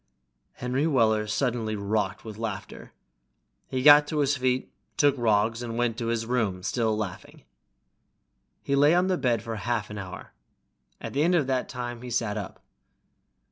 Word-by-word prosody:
Henry 130 +5 -1
Weller 110 -7 +2
suddenly 115 -1 -1
rocked 105 0 -2
with 110 -1 -8
laughter. 110 -4 -6 0.8
He 130 -1 -2
got 145 0 +8
to 155 - -3
his 145 -1 +2
feet, 130 -1 -1 0.2
took 145 -2 +4
Roggs, 115 -1 +1
and 115 -1 -5
went 120 -2 0
to 115 - -2
his 115 -1 -1
room, 110 -7 -1
still 110 0 0
laughing. 100 -4 -6 1.2
He 140 - 0
lay 145 +4 +5
on 180 +1 +2
the 185 - +1
bed 120 -5 +1
for 115 -1 -5
half 110 +1 -2
an 105 - -6
hour. 95 -1 -9 0.7
At - - -7
the 140 - +1
end 175 +3 +3
of 155 -5 +2
that 130 -1 -1
time 120 -2 -5
he 125 - -7
sat 115 -3 -1
up. 100 -4 -7
120 Hz, 170 wpm, -26 LUFS, 110-130 Hz, 1.2 s, got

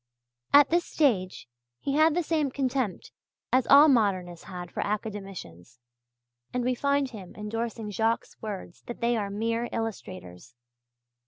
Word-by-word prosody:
At 290 +1 +7
this 345 +1 +3
stage 200 - 0 0.3
he 275 - -2
had 310 +1 +4
the 350 - +1
same 310 -3 0
contempt 260 -5 -2 0.4
as 255 -1 +3
all 285 +2 +9
modernists 190 - +1
had 180 -2 -7
for - - -3
academicians, 195 - -5 0.7
and 250 0 -1
we 255 +1 +1
find 280 +1 0
him 195 -6 -10
endorsing 225 0 -4
Jacques' 225 +3 +1 0.2
words 200 -5 -7
that 240 - -6
they 235 +1 +1
are 205 -3 -2
"mere 230 +3 -1
illustrators!" 185 - -6
225 Hz, 140 wpm, -27 LUFS, 195-265 Hz, 0.7 s, all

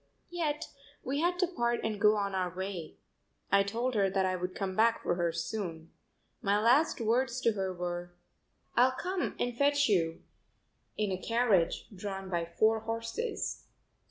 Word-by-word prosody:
Yet 310 -4 -1 0.4
we 275 +3 -1
had 350 +2 +1
to 365 0 +2
part 240 -9 0
and 215 -2 -2
go 210 0 +6
on 200 -1 -1
our 185 -1 0
way. 185 -2 -5 0.6
I 200 - +6
told 230 +6 -1
her 200 -3 +3
that 190 0 +1
I 185 0 +1
would 180 0 -4
come 190 -2 -3
back 230 +2 +3
for - - +1
her 170 -1 0
soon. 170 -1 -4 0.5
My 200 +1 +2
last 250 +9 +4
words 240 +2 +1
to 230 - +4
her 190 -3 -2
were: 175 0 -4 0.6
"I'll 255 +2 +5
come 370 0 -2
and 245 -1 -1
fetch 285 +2 +3
you 165 -6 +1 0.7
in 210 -2 0
a 185 0 -3
carriage 230 -7 +2
drawn 195 0 -5
by 170 -1 0
four 220 +6 +2
horses." 230 - -3
210 Hz, 165 wpm, -31 LUFS, 185-240 Hz, 0.7 s, go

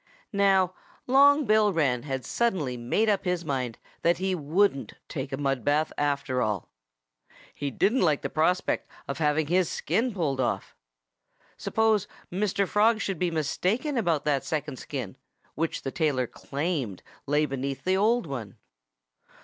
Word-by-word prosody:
Now, 195 -2 +3 0.3
Long 285 +3 +5
Bill 215 -1 +4
Wren 140 -8 +1
had 135 -3 -4
suddenly 185 - 0
made 125 - 0
up 205 -2 +2
his 180 -2 -1
mind 130 -5 -2 0.2
that 170 0 +3
he 190 +1 0
wouldn't 165 -1 +1
take 135 -1 -5
a 135 - -2
mud 135 -3 -1
bath, 150 +4 +1
after 140 -3 0
all. 105 -6 -1 0.8
He 145 - -3
didn't 210 - +2
like 150 -2 +2
the - - 0
prospect 175 +4 +1 0.2
of 140 - -4
having 150 0 +2
his 175 +2 +2
skin 245 +3 0
pulled 155 -9 -1
off. 125 - -2 0.8
Suppose 220 -3 +1 0.2
Mr. 200 +1 0
Frog 220 +3 +3
should 195 -6 -2
be 180 - +1
mistaken 185 - -1
about 170 - +1
that 145 -3 +1
second 150 -3 -3
skin, 125 -10 -5 0.4
which 165 +1 -2
the 135 - -3
tailor 145 -6 +1
claimed 140 - -3 0.2
lay 145 +2 +3
underneath 135 -1 -3
the 185 +1 +2
old 220 +3 +2
one? 120 -9 -6
160 Hz, 150 wpm, -27 LUFS, 135-195 Hz, 0.8 s, Long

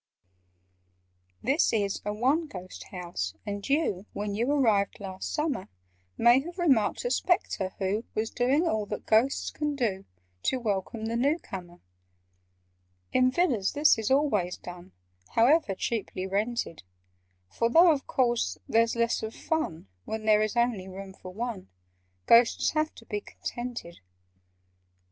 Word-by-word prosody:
"This 275 +6 +3
is 205 -3 0
a 210 - -2
'one 270 +10 +1
ghost' 185 -7 -9
house, 170 - -5
and 205 +2 -5
you 275 - 0
When 205 0 -3
you 235 +6 0
arrived 220 -9 +2
last 190 -2 -6
summer, 300 -10 -1 0.5
May 240 +2 +6
have 345 +6 -8
remarked 285 - +2
a - - 0
Spectre 205 - 0
who 200 +4 -1
Was 220 +1 -1
doing 275 +8 +2
all 215 -7 0
that 210 - -5
Ghosts 230 +5 +2
can 295 -1 -2
do 210 -8 -1 0.4
To 260 - 0
welcome 220 0 -2
the 230 +1 -2
new 280 +7 +2
comer. 175 - -9 1.3
"In 255 0 +4
Villas 255 - +1
this 295 -5 +4
is 220 - -1
always 260 -11 +2
done— 175 - -10 0.4
However 235 - +4
cheaply 195 -3 -3
rented: 205 -2 -2 0.7
For, 230 - +1
though 335 +7 +7
of 285 -3 -2
course 240 -3 +1
there's 230 +1 +3
less 235 0 +1
of 220 0 -5
fun 165 - -2 0.2
When 220 0 -4
there 215 -1 +5
is 215 +1 -1
only 235 -6 +1
room 190 0 -8
for 185 - -11
one, 220 - -5 0.6
Ghosts 230 0 +5
have 310 0 0
to 230 - -14
be 210 -2 -3
contented. 240 -10 -6
225 Hz, 145 wpm, -28 LUFS, 195-265 Hz, 1.3 s, though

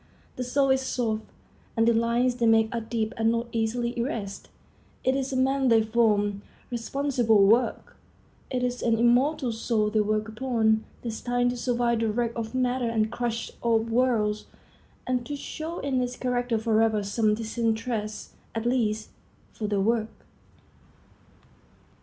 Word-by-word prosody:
The 250 - -3
soul 270 +2 +2
is 265 0 +3
soft, 225 -4 -2 0.5
and 225 0 +3
the 235 - +5
lines 235 +2 +2
they 235 -2 +2
make 225 0 +4
are 235 - -1
deep 225 0 -2
and 225 0 +3
not 230 0 -1
easily 235 +2 -1
erased. 215 -5 -4 0.5
It 260 +1 +2
is 270 0 -2
a - - -2
man 265 +1 +2
they 225 -2 +5
form. 210 -3 +1 0.3
Responsible 240 -3 +2
work! 230 +5 +2 0.5
It 250 -1 -1
is 245 0 -1
an 230 -1 +2
immortal 245 +3 +3
soul 220 -1 0
they 215 - +2
work 215 +1 0
upon, 220 -1 +1 0.2
destined 245 +1 0
to 245 - -5
survive 240 -1 +1
the 225 -1 +1
wreck 235 +1 0
of 230 +1 -4
matter 250 -1 +1
and 220 -2 +2
the - - -7
crush 235 -1 -3
of 230 -1 +1
worlds, 225 -4 +1 0.6
and 250 -1 0
to 290 - -3
show 315 +4 -6
in 265 -2 0
its 250 0 -2
character 245 -2 -1
forever 220 -1 +2
some 210 +1 +1
distant 225 0 -1
trace, 220 -3 -4 0.2
at 225 0 -2
least, 220 -4 0 0.5
of 210 -2 -2
their 200 -2 +1
work. 220 +1 +1
230 Hz, 160 wpm, -26 LUFS, 220-250 Hz, 0.6 s, the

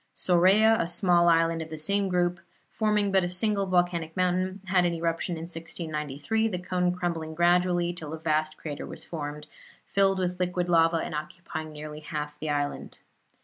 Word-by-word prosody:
Sorea, 195 +5 +5
a 170 - -1
small 175 -1 +4
island 165 0 +3
of 160 - -7
the 160 - -6
same 200 +5 +1
group, 175 -1 +1 0.3
forming 210 -2 +1
but 190 -1 +3
a 175 - -1
single 200 +2 0
volcanic 175 -3 0
mountain, 185 +1 0
had 185 -1 +3
an 175 -1 +1
eruption 165 +1 -2
in 160 - -6
1693, 165 +3 -3
the 195 -5 -2
cone 180 0 0
crumbling 170 -3 -3
gradually 175 0 +2
till 155 -4 -8
a 160 - -4
vast 155 -1 -1
crater 145 -2 -6
was - - -8
formed, 150 -2 -6 0.4
filled 195 -1 +2
with 180 -1 -2
liquid 180 -1 -1
lava 165 -1 +4
and 160 - -4
occupying 155 +1 -6
nearly 150 0 -8
half 150 -1 -5
the 155 - -4
island. 145 -1 -3
175 Hz, 175 wpm, -27 LUFS, 160-185 Hz, 0.4 s, Sorea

